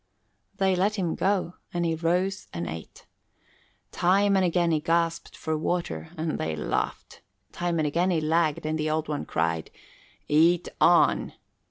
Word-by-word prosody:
They 190 Hz, -2 st, +2 dB
let 200 Hz, +4 st, +1 dB
him 180 Hz, -5 st, -1 dB
go 190 Hz, -3 st, 0 dB
and 175 Hz, -1 st, -1 dB
he 165 Hz, -, +1 dB
rose 180 Hz, +4 st, -1 dB
and 85 Hz, 0 st, -4 dB
ate. 80 Hz, +1 st, -8 dB, 0.9 s
Time 200 Hz, +3 st, +3 dB
and 190 Hz, -, +3 dB
again 175 Hz, -1 st, +2 dB
he 155 Hz, -, +2 dB
gasped 165 Hz, +1 st, -1 dB
for 160 Hz, -1 st, -2 dB
water 155 Hz, -, -2 dB
and 155 Hz, 0 st, -2 dB
they 80 Hz, 0 st, -2 dB
laughed; 75 Hz, -, -3 dB, 0.3 s
time 175 Hz, -1 st, -2 dB
and 155 Hz, -, +1 dB
again 170 Hz, +5 st, +1 dB
he 175 Hz, -3 st, +2 dB
lagged 155 Hz, -1 st, +1 dB
and 155 Hz, 0 st, -1 dB
the 155 Hz, 0 st, 0 dB
Old 155 Hz, 0 st, -1 dB
One 150 Hz, -1 st, -3 dB
cried, 80 Hz, 0 st, -1 dB, 0.6 s
"Eat 165 Hz, +3 st, +3 dB
on!" -, -, +4 dB
165 Hz, 160 wpm, -26 LUFS, 155-180 Hz, 0.9 s, on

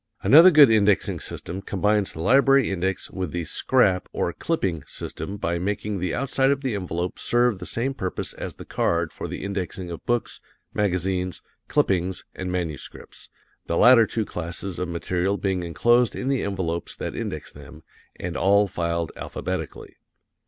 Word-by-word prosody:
Another 165 Hz, +6 st, +9 dB
good 145 Hz, -7 st, +7 dB
indexing 105 Hz, -2 st, +3 dB
system 95 Hz, +3 st, -6 dB
combines 105 Hz, +1 st, 0 dB
the 80 Hz, -, -6 dB
library 135 Hz, +5 st, +4 dB
index 95 Hz, +1 st, -2 dB
with 90 Hz, -5 st, -4 dB
the 85 Hz, -2 st, -3 dB
"scrap," 95 Hz, -, +2 dB
or 85 Hz, -, -1 dB
clipping, 95 Hz, -, -2 dB
system 100 Hz, -, -6 dB
by 85 Hz, -3 st, -1 dB
making 100 Hz, +2 st, -2 dB
the 90 Hz, -1 st, -1 dB
outside 135 Hz, 0 st, +1 dB
of 140 Hz, 0 st, +1 dB
the 130 Hz, -4 st, -2 dB
envelope 90 Hz, -2 st, -3 dB
serve 120 Hz, -4 st, +2 dB
the 90 Hz, -, -6 dB
same 130 Hz, +4 st, -1 dB
purpose 95 Hz, -8 st, -4 dB
as -, -, -6 dB
the -, -, -10 dB
card 85 Hz, -1 st, 0 dB
for -, -, -6 dB
the -, -, -6 dB
indexing 95 Hz, -2 st, -4 dB
of 85 Hz, -, -7 dB
books, 120 Hz, -1 st, -1 dB, 0.3 s
magazines, 90 Hz, -2 st, -1 dB, 0.2 s
clippings 90 Hz, -1 st, 0 dB
and 95 Hz, -1 st, -4 dB
manuscripts, 85 Hz, -7 st, -6 dB, 0.4 s
the 85 Hz, -, 0 dB
latter 120 Hz, -3 st, +7 dB
two 110 Hz, -2 st, -2 dB
classes 90 Hz, +2 st, -5 dB
of 90 Hz, -, -2 dB
material 90 Hz, +3 st, -1 dB
being 95 Hz, -3 st, -1 dB
enclosed 120 Hz, +8 st, +2 dB
in 130 Hz, -, -3 dB
the 135 Hz, -2 st, +1 dB
envelopes 90 Hz, -4 st, -3 dB
that -, -, -5 dB
index -, -, -5 dB
them, -, -, -13 dB, 0.3 s
and 85 Hz, -2 st, -5 dB
all 100 Hz, +4 st, +4 dB
filed 85 Hz, -3 st, -2 dB
alphabetically. 90 Hz, -3 st, -5 dB
95 Hz, 160 wpm, -24 LUFS, 90-115 Hz, 0.4 s, Another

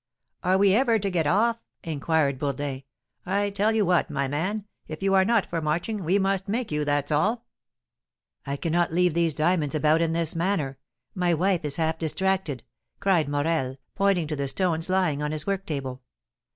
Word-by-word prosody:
"Are 185 Hz, +1 st, +2 dB
we 195 Hz, -1 st, +4 dB
ever 235 Hz, 0 st, +3 dB
to 200 Hz, -2 st, -2 dB
get 165 Hz, -4 st, +1 dB
off?" 230 Hz, +7 st, +2 dB, 0.2 s
inquired 155 Hz, -3 st, 0 dB
Bourdin. 140 Hz, -1 st, -3 dB, 0.4 s
"I 200 Hz, +2 st, 0 dB
tell 205 Hz, +2 st, +1 dB
you 220 Hz, -2 st, +2 dB
what, 175 Hz, -1 st, +2 dB
my 140 Hz, -2 st, -1 dB
man, 185 Hz, +9 st, -2 dB, 0.2 s
if 155 Hz, +4 st, -7 dB
you 195 Hz, 0 st, +2 dB
are 190 Hz, -1 st, +5 dB
not 225 Hz, 0 st, +2 dB
for 165 Hz, -1 st, -3 dB
marching, 170 Hz, +7 st, -2 dB
we 180 Hz, +5 st, +2 dB
must 195 Hz, -1 st, 0 dB
make 225 Hz, +1 st, -2 dB
you, 150 Hz, 0 st, 0 dB
that's 145 Hz, 0 st, 0 dB
all." 215 Hz, +11 st, +1 dB, 1.0 s
"I 140 Hz, 0 st, -3 dB
cannot 170 Hz, +2 st, 0 dB
leave 180 Hz, 0 st, +2 dB
these 165 Hz, -2 st, +1 dB
diamonds 155 Hz, -2 st, +1 dB
about 155 Hz, +2 st, +3 dB
in 165 Hz, -1 st, +1 dB
this 165 Hz, -1 st, -1 dB
manner, 165 Hz, -6 st, -1 dB, 0.3 s
my 175 Hz, -2 st, +1 dB
wife 180 Hz, +1 st, +1 dB
is 145 Hz, -2 st, -2 dB
half 160 Hz, -1 st, -1 dB
distracted," 170 Hz, -4 st, -1 dB, 0.4 s
cried 175 Hz, -7 st, +2 dB
Morel, 145 Hz, -2 st, -1 dB, 0.2 s
pointing 195 Hz, -4 st, +2 dB
to 155 Hz, 0 st, -3 dB
the 140 Hz, -1 st, -2 dB
stones 165 Hz, +2 st, -1 dB
lying 180 Hz, -6 st, +1 dB
on 150 Hz, 0 st, -1 dB
his 155 Hz, -1 st, -2 dB
work 195 Hz, -1 st, -2 dB
table. 135 Hz, -4 st, -4 dB
170 Hz, 185 wpm, -26 LUFS, 150-195 Hz, 1.0 s, are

